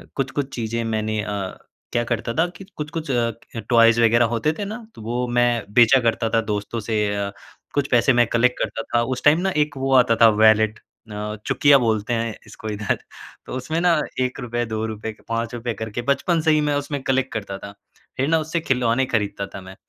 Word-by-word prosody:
कुछ-कुछ 135 0 -2
चीज़ें 115 0 -2
मैंने 110 -1 -1
अ 100 -2 -4 0.4
क्या 120 0 +2
करता 115 -1 -2
था 165 +7 +2
कि 195 - -11
कुछ-कुछ 155 0 -5
अ, 120 -2 +1 0.4
टॉयज़ 115 -1 +5
वग़ैरह 115 +1 +5
होते 115 +6 0
थे 205 - -2
ना 215 +3 -5 0.2
तो - - -11
वो 120 +3 -2
मैं 120 -4 +1
बेचा 120 +3 +6
करता 115 -1 0
था - - +5
दोस्तों 105 +1 -3
से 110 +1 -3 0.2
अ, 100 0 -2 0.4
कुछ 140 -1 +1
पैसे 125 +2 +4
मैं 120 - +6
कलेक्ट 125 +2 +2
करता 115 - -2
था 120 - +4
उस - - -8
टाइम 150 +3 +6
ना 190 - +1
एक 150 -2 -9
वो 135 0 0
आता 125 -2 +5
था 115 - +9
वैलेट 110 0 +4 0.3
अ, 105 +1 -4
चुकिया 145 -1 +5
बोलते 110 -1 0
हैं 115 -1 -1
इसको 110 - -8
इधर। 105 -1 -1 0.5
तो - - -6
उसमें 155 +6 -2
ना 180 -1 +4 0.3
1, 120 -1 -2
2, 110 0 -4
के - - -25
5 115 +1 -2
करके 110 +2 -4
बचपन 165 +4 +2
से 160 0 +3
ही 155 - +3
मैं 150 -1 +1
उसमें 145 -1 -3
कलेक्ट 135 0 0
करता 100 -3 -4
था। 100 - -9 0.5
फ़िर 135 - +1
ना 165 - +3
उससे 160 +2 -2
खिलौने 125 -2 +1
ख़रीदता 100 -2 -1
था 100 - -7
मैं। 95 0 -11
115 Hz, 200 wpm, -22 LUFS, 110-135 Hz, 0.5 s, था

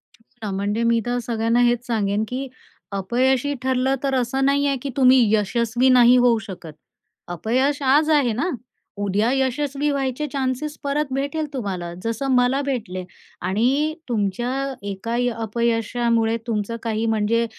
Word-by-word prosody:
हो 225 -1 -11
ना, - - -3
म्हणजे 205 +4 -1
मी 230 0 +3
तर 245 0 -1
सगळ्यांना 230 0 +1
हेच 240 0 +1
सांगेन 210 -3 0
की, 260 +3 -4 0.4
अपयशी 250 +8 +1
ठरलं 260 +1 +1
तर 270 -1 +1
असं 260 +2 0
नाही 280 +1 +2
आहे, 275 -1 +1
की 280 - -4
तुम्ही 260 -1 +6 0.2
यशस्वी 235 +4 +1
नाही 250 -1 +7
होऊ 245 -2 +4
शकत. 175 -5 -9 0.5
अपयश 250 - 0
आज 290 +4 +4
आहे 285 -7 +3
ना, 270 +11 -1 0.5
उद्या 205 +4 +1
यशस्वी 275 +2 0
व्हायचे 275 +1 -1
चान्सेस 275 +2 -3
परत 285 -1 -1
भेटेल 285 +4 -1
तुम्हाला, 185 -9 -4
जसं 230 +4 -2
मला 250 +2 +3
भेटले. 225 -10 -3 0.4
आणि, 250 - +1 0.2
तुमच्या 220 +2 -1 0.4
एका 200 +4 -4
अ, 245 0 +1
अपयशामुळे 230 0 0
तुमचं 220 0 -2
काही 225 -1 -1
म्हणजे 225 +1 +1
245 Hz, 145 wpm, -22 LUFS, 225-270 Hz, 0.5 s, नाही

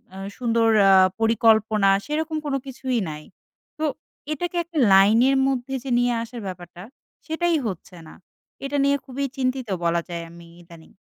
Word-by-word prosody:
আ - - -9 0.2
সুন্দর 230 -2 +1 0.2
আ - - +6 0.3
পরিকল্পনা, 220 -2 +3 0.2
সেরকম 315 +1 -2
কোনো 280 -2 -1
কিছুই 260 -2 -3
নাই, 150 0 -8 0.6
তো 315 - 0 0.5
এটাকে 350 +4 -4
একটা 335 -1 -9 0.2
লাইনের 225 +8 +5
মধ্যে 265 0 -2
যে 270 - -6
নিয়ে 245 0 +2
আসার 235 0 -9
ব্যাপারটা, 180 -1 -9 0.4
সেটাই 340 +1 0
হচ্ছে 185 -1 -7
না, - - -13 0.5
এটা 285 +1 -2
নিয়ে 280 0 +2
খুবই 275 +1 -4
চিন্তিত 255 -1 -2 0.2
বলা 170 0 +1
যায় 170 -1 -5
আমি 170 0 -14
ইদানিং। 170 -2 -16
240 Hz, 150 wpm, -23 LUFS, 190-275 Hz, 0.6 s, আ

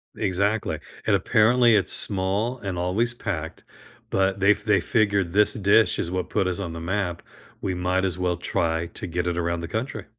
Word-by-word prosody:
Exactly. 100 +3 -1 0.3
And 105 - +3
apparently, 115 +4 +4
it's 100 - +1
small 100 +5 +2
and 100 -4 -5
always 100 +7 0
packed, 85 -9 -5 0.5
but 95 0 0
they 100 +1 +5
f 105 0 -1
they 105 -2 +3
figured, 100 -6 +1
"This 105 +1 +4
dish 105 0 +3
is 85 - -2
what 90 -1 -3
put 95 - +1
us 95 +1 -2
on 85 -4 -5
the 85 - -6
map, 90 -1 -2 0.4
we 95 - -2
might 90 +1 0
as 90 -2 -2
well 90 -1 0
try 85 -2 -1
to 85 - -7
get 90 +1 -2
it 85 0 -1
around 85 0 -1
the 85 - -5
country." 110 +9 -4
95 Hz, 195 wpm, -24 LUFS, 90-105 Hz, 0.5 s, they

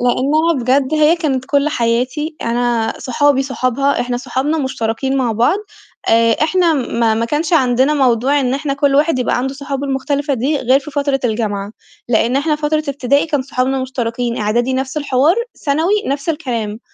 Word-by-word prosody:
لإنّها 285 +7 +2
بجد 265 +4 +1
هي 310 +2 +4
كانت 275 -6 -1
كل 280 +2 +1
حياتي، 255 +5 -1
أنا 235 -1 0
صحابي 270 +2 +1
صحابها، 270 +1 0
إحنا 245 0 -2
صحابنا 265 +5 -2
مشتركين 260 -1 -2
مع 250 -4 0
بعض 245 - +2 0.5
آآ، 230 0 +4
إحنا 345 +1 +2
ما 235 -4 0
ما 225 +1 0
كانش 300 +7 -2
عندنا 260 -1 +3
موضوع 265 +1 +2
إن 255 -1 0
إحنا 280 0 -2
كل 280 0 +1
واحد 295 0 +2
يبقى 250 - 0
عنده 265 +2 -2
صحابه 280 0 -4
المختلفة 280 +1 -1
دي 270 +5 0
غير 260 +1 +3
في 290 - -10
فترة 280 -1 -1
الجامعة، 215 -3 -2 0.4
لإن 240 +2 +2
إحنا 300 +2 +1
فترة 305 +1 -1
ابتدائي 280 +1 +1
كان 295 -4 -1
صحابنا 260 0 -1
مشتركين، 240 -2 -3
إعدادي 235 +5 0
نَفْس 265 +2 -3
الحوار، 285 +2 +2 0.3
ثانوي 315 +6 +1
نَفْس 280 +3 -3
الكلام، 235 -9 -3
265 Hz, 165 wpm, -17 LUFS, 245-290 Hz, 0.5 s, هي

